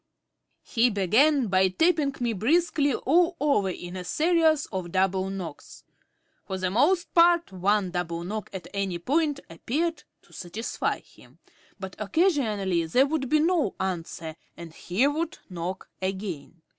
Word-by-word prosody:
He 240 +1 +2
began 240 - +3
by 190 -2 +3
tapping 295 - +1
me 240 -2 0
briskly 290 - +2
all 340 +5 +2
over 280 -10 +2
in 175 0 -7
a 185 - -5
series 320 - +2
of 185 -4 -4
double 190 0 +1
knocks. 180 -6 -8 0.6
For 190 - -3
the 185 -1 -1
most 320 - +2
part 340 - +4
one 190 +1 +1
double 170 -1 -3
knock 210 +3 -5
at 190 -4 -7
any 195 -3 -2
point 285 - 0
appeared 300 - -2 0.2
to - - -22
satisfy 190 +6 -3
him, - - -21 0.4
but 190 -1 -7
occasionally 210 - +1
there 250 +12 +4
would 285 -3 -2
be 305 +1 +3
no 330 - +1
answer 165 -3 -4 0.2
and 170 -2 -10
he 185 +10 0
would 310 +3 -1
knock 180 +2 -5
again. 185 -4 -5
210 Hz, 145 wpm, -26 LUFS, 185-300 Hz, 0.6 s, part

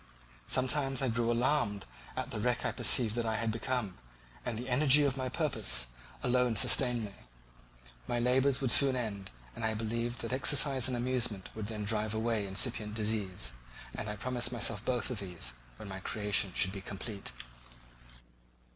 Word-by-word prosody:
Sometimes 135 +1 +2
I 130 - +1
grew 115 0 0
alarmed 120 -4 +1 0.3
at - - -4
the - - -4
wreck - - 0
I - - +1
perceived 115 -4 +2
that 120 0 -2
I 110 - 0
had 115 0 -1
become; 115 -4 -3 0.4
the 120 0 -4
energy 140 +3 +5
of 140 -3 +1
my 130 -1 -3
purpose 115 - +1 0.3
alone 125 -1 +2
sustained 120 +2 +3
me: 100 - -8 1.0
my 120 - -1
labours 130 +3 +2
would 130 -3 +2
soon 135 +2 +6
end, 105 -6 -4 0.3
and - - -6
I 110 0 0
believed 115 +2 -2
that 115 +2 -3
exercise 135 -1 +3
and 125 -2 -1
amusement 120 -6 -2
would 110 -2 -5
then 105 -1 -5
drive 110 0 -1
away 110 -2 -1
incipient 105 +2 +3
disease; 105 - -2 0.4
and 110 - -5
I 105 - -3
promised 125 +3 -2
myself 115 -3 0
both 125 0 -1
of 120 - -3
these 90 -11 -5 0.2
when - - -9
my 95 -1 -6
creation 105 0 0
should 95 - +3
be 100 -1 -6
complete. 100 +1 -5
115 Hz, 165 wpm, -32 LUFS, 105-125 Hz, 1.0 s, soon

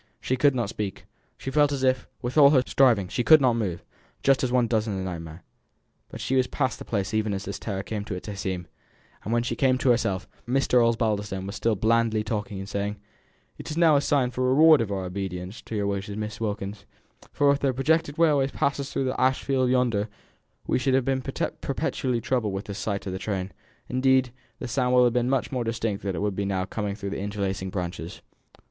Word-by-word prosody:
She 130 - -1
could 140 +1 +3
not 120 -4 0
speak. 105 -3 -5 0.3
She 135 - -5
felt 145 0 +3
as 135 -2 -2
if, 130 0 +1 0.2
with 120 +1 -3
all 145 -2 +8
her 135 -3 +4
striving, 115 -8 +3
she 120 - -1
could 155 +3 +8
not 130 -3 +3
move 95 -7 -2 0.4
just 135 -1 +3
as 125 - 0
one 125 -1 +3
does 110 -1 0
in 105 - -2
a 95 -1 -3
nightmare 85 -2 -7 0.7
but - - -9
she 135 - -1
was 130 -1 +3
past 130 - -1
the - - -8
place 100 -3 -2
even 110 -2 0
as 95 +1 -5
this 100 0 -5
terror 95 -3 -4
came 105 -1 -4
to 105 - -4
its 90 - -8
acme; 95 -3 -4 0.6
and 105 - -4
when 120 0 +2
she 120 - -2
came 130 -2 +2
to 130 -1 +3
herself, 100 -5 0 0.2
Mr. 125 -1 +3
Osbaldistone 105 -4 0
was 100 +1 -6
still 115 +2 +1
blandly 110 +1 +2
talking, 105 -2 -3
and 95 0 -6
saying 100 +1 -2 0.6
"It - - -7
is 150 - -4
now 165 -3 +5
a - - +5 0.4
reward 135 0 +5
for 100 0 -3
our 95 - -4
obedience 90 +1 -5
to 115 - -7
your 100 -1 0
wishes, 100 0 -3
Miss 105 +1 -5
Wilkins, 100 -1 -4 0.4
for 145 -1 +3
if 140 - +1
the 135 - +1
projected 145 +3 +1
railway 150 -5 +4
passes 140 0 -2
through 135 - -1
the 130 - -2
ash 130 +1 +2
field 130 -2 +1
yonder 120 -5 +1 0.6
we - - +1
should 130 0 +2
have 130 -2 +2
been 135 -1 0
perpetually 125 -1 -2
troubled 110 -4 -1
with 95 +1 -4
the 100 - -6
sight 100 0 -3
of 95 - -4
the 95 - -4
trains; 95 -1 -3 0.4
indeed, 130 0 +2 0.3
the 125 - -6
sound 125 +1 +1
would 125 - +6
have 120 -1 +3
been 125 0 +1
much 135 -1 0
more 125 -3 -1
distinct 115 -3 -2
than 95 -2 -3
it 80 - -3
will 105 - +1
be 100 +1 -3
now 95 -1 -1
coming 100 0 -3
through 100 -2 -5
the - - -3
interlacing 100 -2 -3
branches. 90 -2 -5
115 Hz, 220 wpm, -26 LUFS, 100-130 Hz, 0.7 s, all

